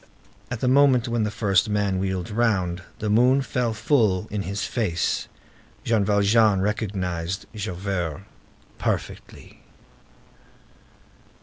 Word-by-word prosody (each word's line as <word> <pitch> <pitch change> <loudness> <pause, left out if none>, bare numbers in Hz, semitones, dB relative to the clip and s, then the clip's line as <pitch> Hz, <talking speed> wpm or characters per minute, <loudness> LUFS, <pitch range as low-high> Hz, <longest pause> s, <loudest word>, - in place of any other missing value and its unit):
At 120 -2 -5
the 125 - +1
moment 130 -2 +4
when 115 -2 0
the - - -1
first 100 -1 +1
man 100 -2 0
wheeled 95 -2 -3
round, 95 -6 0 0.2
the 105 - -4
moon 125 +6 +4
fell 125 -3 -1
full 110 -3 +1
in 105 -1 -2
his 100 +1 -3
face. 95 -8 -1 0.6
Jean 115 -3 +2
Valjean 105 0 +3
recognized 95 -4 -2
Javert 95 -4 -3 0.6
perfectly. - - -5
105 Hz, 110 wpm, -24 LUFS, 95-115 Hz, 0.6 s, moment